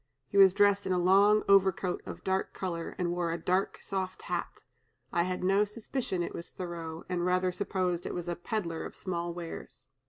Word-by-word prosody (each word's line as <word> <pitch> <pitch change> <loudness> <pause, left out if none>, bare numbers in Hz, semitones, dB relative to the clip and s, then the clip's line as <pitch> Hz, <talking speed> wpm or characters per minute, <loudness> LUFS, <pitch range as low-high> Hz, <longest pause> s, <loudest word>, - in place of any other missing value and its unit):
He - - -9
was 190 -1 +8
dressed 200 0 +4
in 185 - +1
a - - +2
long 200 +4 +5
overcoat 190 -2 +3
of - - -7
dark 190 0 -1
color, 170 -3 -4
and 175 -2 0
wore 175 -1 -1
a 165 - -1
dark 185 +3 0
soft 185 -1 -3
hat. - - -4 0.5
I 170 - +3
had 180 +1 -2
no 195 +2 +4
suspicion 210 -2 -3
it - - -5
was 170 - -6
Thoreau, 170 -3 -6
and 180 -1 -1
rather 180 0 +2
supposed 180 -2 -1
it - - -4
was 175 -1 -4
a 175 - -1
pedler 175 -3 -3
of - - -8
small 175 -2 -3
wares." 170 -5 -8
185 Hz, 195 wpm, -30 LUFS, 175-195 Hz, 0.5 s, was